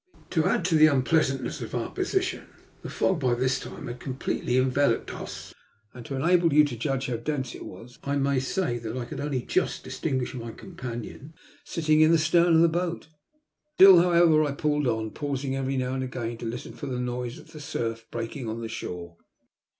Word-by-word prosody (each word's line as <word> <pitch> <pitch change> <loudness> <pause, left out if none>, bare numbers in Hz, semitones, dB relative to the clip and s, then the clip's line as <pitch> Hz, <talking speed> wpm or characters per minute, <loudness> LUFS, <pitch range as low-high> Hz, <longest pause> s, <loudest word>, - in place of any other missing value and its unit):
To 160 -3 +2
add 170 - +1
to 180 - +1
the 155 0 +7
unpleasantness 135 -1 +1
of - - -5
our - - -2
position, 375 -1 -1 0.3
the - - -7
fog 190 -4 +1
by 125 -4 +2
this 130 +2 +1
time - - -8
had 120 -2 -6
completely 130 -1 -2
enveloped 130 -1 +1
us, - - -8 0.4
and 125 - -9
to 135 - -4
enable 170 +4 +3
you 150 +1 +6
to 145 -5 -2
judge 135 +3 -2
how 125 -3 -2
dense 130 0 -3
it - - -8
was 125 +5 -12
I 140 0 -1
may 140 -1 +1
say 130 -2 -1
that 115 +1 -5
I 125 - -3
could 140 +3 -7
only 140 -4 -2
just - - -1
distinguish 130 -2 -2
my 115 -3 -6
companion 130 - -8 0.3
sitting 155 -2 +2
in 155 +1 +6
the 165 - +6
stem 165 +2 +3
of 165 -1 +5
the 170 - +6
boat. 170 0 -2 0.7
Still, 190 -2 +9
however, 170 -3 +5
I 145 -2 -1
pulled 150 -1 0
on, 110 -2 -1
pausing 140 -2 -3
every 135 0 -1
now 130 0 -1
and 130 0 -2
again 120 -2 -4
to 115 - -5
listen 120 +2 -6
for 145 - -7
the 125 -2 -3
noise 125 -1 -3
of - - -15
the 155 - -10
surf 115 -5 -4
breaking 115 +1 -5
on 110 +1 -4
the 115 - -5
shore. 85 -5 -6
135 Hz, 205 wpm, -26 LUFS, 120-155 Hz, 0.7 s, Still